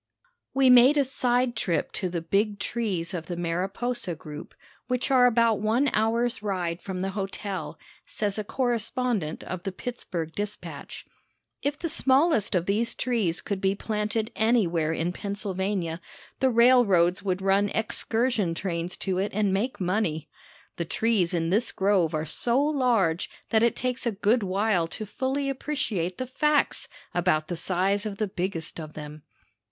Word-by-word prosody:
We 265 -1 +6
made 250 +4 +7
a 285 - +5
side 250 -2 0
trip 170 -7 -1
to 185 - -3
the 170 -1 -3
big 205 +4 +1
trees 200 -6 -2
of 165 -3 -4
the 175 - -3
Mariposa 185 +4 -2
group, 150 -1 -10 0.3
which 250 +1 -1
are 250 -2 +6
about 230 -2 +3
one 235 +6 +2
hour's 230 +2 +1
ride 180 -4 -2
from 185 -2 -5
the 195 +1 -1
hotel, 195 -4 -4 0.3
says 205 -1 -3
a - - -2
correspondent 240 - -1
of 185 -1 -5
the 195 - -4
Pittsburg 180 -6 -5
Dispatch. 205 +2 -6 0.6
If 285 +1 -1
the 340 - -3
smallest 275 - +3
of 175 -1 +1
these 215 +4 0
trees 220 -9 0
could 200 -2 -3
be 195 0 +2
planted 215 +1 -2
anywhere 185 -9 +2
in 165 +2 -1
Pennsylvania 190 -4 -3 0.4
the 265 - +3
railroads 230 -8 +5
would 185 -1 -1
run 195 +1 +2
excursion 220 -4 0
trains 175 -1 -3
to 185 -2 0
it 200 +2 -1
and 205 -2 +2
make 230 +7 -1
money. 180 -5 -1 0.5
The 170 - -2
trees 205 -1 +1
in 165 -1 0
this 220 +5 +2
grove 190 -5 +2
are 155 0 -1
so 235 - +1
large 245 - +2 0.2
that 220 - +4
it 235 0 +3
takes 255 0 -2
a - - +2
good 215 +4 +2
while 195 -2 +1
to 215 +6 -6
fully 265 +6 -2
appreciate 255 - -2
the 255 - -3
facts 300 +4 +1 0.3
about 170 -3 +1
the 175 - -2
size 190 +4 0
of 200 -2 -6
the 215 - 0
biggest 180 -3 -3
of 155 -1 -8
them. 150 0 -8
205 Hz, 160 wpm, -26 LUFS, 180-240 Hz, 0.6 s, made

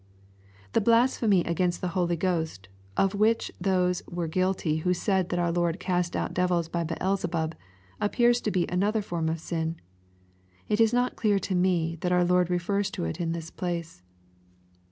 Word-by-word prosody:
The - - +3
blasphemy 230 -4 +3
against 175 +1 0
the 180 - -2
Holy 175 -1 0
Ghost^ 165 - -1 0.3
of 195 0 +2
which 215 +3 +2
those 180 -1 +1
were 170 -1 -3
guilty 185 -2 0
who 180 +3 +1
said 190 -1 0
that 175 - -1
our 175 -1 +1
Lord 175 +1 0
cast 180 -1 -1
out - - -2
devils 180 -2 +1
by 170 0 -2
Beelzebub, 170 -1 -1 0.5
ap 205 - +1
pears 240 0 +4
to - - -1
be 185 -4 +1
another 205 +4 0
form 165 -4 -2
of 160 +1 -2
sin. 165 0 -3 0.9
It 210 +2 +2
is 225 -1 +5
not 245 +1 +1
clear 210 -3 +2
to 195 - -2
me 175 -2 +1
that 180 - 0
our 180 0 +4
Lord 180 0 +3
refers 195 +3 0
to 85 - -4
it 80 - -4
in 165 -1 -1
this 165 -1 -6
place. 170 - -4
180 Hz, 175 wpm, -27 LUFS, 170-195 Hz, 0.9 s, is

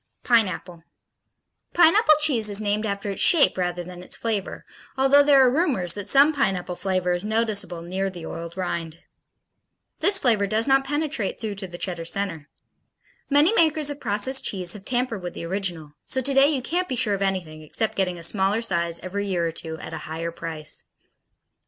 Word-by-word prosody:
Pineapple 185 -7 0 0.9
Pineapple 345 0 +6
cheese 245 -9 +3
is 200 0 +3
named 210 +1 -1
after 200 0 -3
its 195 - -4
shape 320 -5 +5
rather 175 -1 -2
than 180 0 -10
its 180 - -2
flavor, 215 -4 -3 0.3
although 270 +2 +5
there 285 -2 +5
are 250 - +3
rumors 255 - +1
that 205 -1 -5
some 280 +7 +5
pineapple 190 -10 -1
flavor 185 -1 -1
is 175 +1 0
noticeable 210 -6 0
near 190 +3 -2
the 175 -3 -9
oiled 170 +1 -7
rind. 165 -3 -4 1.0
This 395 0 +4
flavor 225 - +2
does 220 +4 +1
not 270 0 +3
penetrate 290 -7 -2
through 220 -2 -4
to 195 -1 -7
the 175 -1 -9
Cheddar 175 -2 -4
center. 165 -5 -2 0.8
Many 295 +7 +4
makers 310 -6 +2
of 285 - -8
processed 240 +3 0
cheese 180 -3 -1
have 205 -1 -12
tampered 245 -4 -2
with 175 0 -7
the - - -6
original, 170 -5 -3
so 260 - -2
today 270 +1 +3
you 280 -4 -1
can't 360 +7 -2
be 260 - -2
sure 215 -3 +1
of 200 - -3
anything 180 -5 -3
except 215 +8 -1
getting 180 -2 -1
a 170 - -9
smaller 195 +4 +1
size 170 -6 -1
every 200 +2 -4
year 175 -3 -1
or 165 - -1
two, 160 0 -4
at - - -9
a - - -4
higher 165 +1 -4
price. 160 -2 -3
200 Hz, 185 wpm, -23 LUFS, 175-260 Hz, 1.0 s, Pineapple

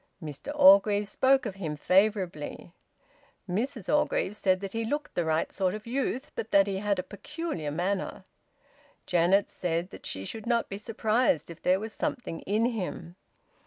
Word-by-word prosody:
Mr 155 - -6
Orgreave 280 -9 +6
spoke 265 +5 +3
of 210 - -3
him 165 -6 -4
favourably. 180 -2 0 0.7
Mrs 225 +3 -2
Orgreave 295 -8 +1
said 185 -3 +2
that 195 -1 -5
he 230 0 -1
looked 290 +7 -3
the 175 - 0
right 160 0 0
sort 185 0 0
of 215 - -8
youth, 260 +2 -2
but 220 - -5
that 200 -2 +5
he 195 -1 -2
had 205 -1 0
a 185 - -2
peculiar 255 - -5
manner. 185 +6 -2 0.8
Janet 180 +3 +3
said 175 +1 -2
that - - -9
she 95 0 -4
should 220 - -7
not 235 -1 +1
be 195 - -4
surprised 220 - +1
if 165 - -12
there 185 +1 +3
was 220 +1 -6
something 275 - -3
in 215 +4 +2
him. 180 -5 -5
200 Hz, 165 wpm, -28 LUFS, 180-230 Hz, 0.8 s, Orgreave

